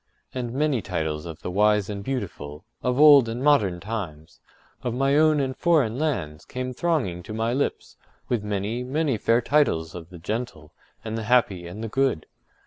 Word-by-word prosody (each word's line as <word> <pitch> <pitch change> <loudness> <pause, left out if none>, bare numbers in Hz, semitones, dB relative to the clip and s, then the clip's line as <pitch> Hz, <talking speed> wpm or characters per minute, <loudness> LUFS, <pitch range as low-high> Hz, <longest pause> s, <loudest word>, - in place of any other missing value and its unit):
And 125 -2 -3
many 140 -2 +1
titles 80 -4 -3
of 80 -1 -9
the - - -3
wise 105 +1 +3
and 100 -1 -5
beautiful, 85 - -5 0.2
of 125 +1 0
old 145 -5 +8
and 120 +3 -4
modern 105 -12 +3
times, 85 -6 -6 0.4
of 120 -1 -3
my 135 +2 +2
own 155 0 +4
and 130 -1 -1
foreign 140 -9 +2
lands, 90 - -2
came 130 0 -5
thronging 125 - -1
to 110 +5 -8
my 115 +2 0
lips, 140 +2 -2 0.3
with 120 -4 -1
many, 105 +4 -2
many 135 -2 0
fair 115 +3 +3
titles 85 - +1
of 85 -2 -9
the 90 - -11
gentle, 105 -5 -5 0.3
and 110 0 -3
the 110 - -5
happy, 100 -8 +2
and 100 +6 -7
the - - -2
good. 130 - 0
115 Hz, 180 wpm, -25 LUFS, 90-130 Hz, 0.4 s, old